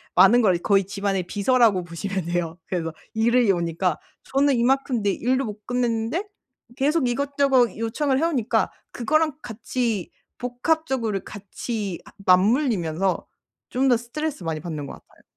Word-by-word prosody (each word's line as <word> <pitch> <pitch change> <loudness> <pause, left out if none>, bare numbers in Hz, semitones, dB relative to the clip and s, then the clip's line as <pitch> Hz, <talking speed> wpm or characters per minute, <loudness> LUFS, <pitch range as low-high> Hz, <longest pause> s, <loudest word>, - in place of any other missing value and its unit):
많은 195 +7 +7
걸 190 -6 +3
거의 195 +2 +2
집안의 195 -1 -1
비서라고 215 -2 +3
보시면 180 +2 -4
돼요. 170 -1 -2
그래서 165 -3 -2 0.2
일이 235 0 +3
오니까. 170 -1 0 0.3
저는 275 0 +2
이만큼 255 0 +1
내 200 - +2
일도 260 +6 0
못 210 -1 -8
끝냈는데 245 - -1 0.5
계속 285 +1 +1
이것저것 270 -3 +2
요청을 260 +5 0
해오니까 280 -8 +1 0.2
그거랑 305 +5 +1
같이 225 -3 -3 0.3
복합적으로 250 - -1
같이 205 -1 -5
아 - - -14
맞물리면서 190 - +2 0.4
좀 265 +2 +1
더 245 - +5
스트레스 265 - -4
많이 160 -1 -2
받는 155 -3 -5
것 - - -8
같아요. - - -18
225 Hz, 325 characters per minute, -24 LUFS, 190-260 Hz, 0.5 s, 많은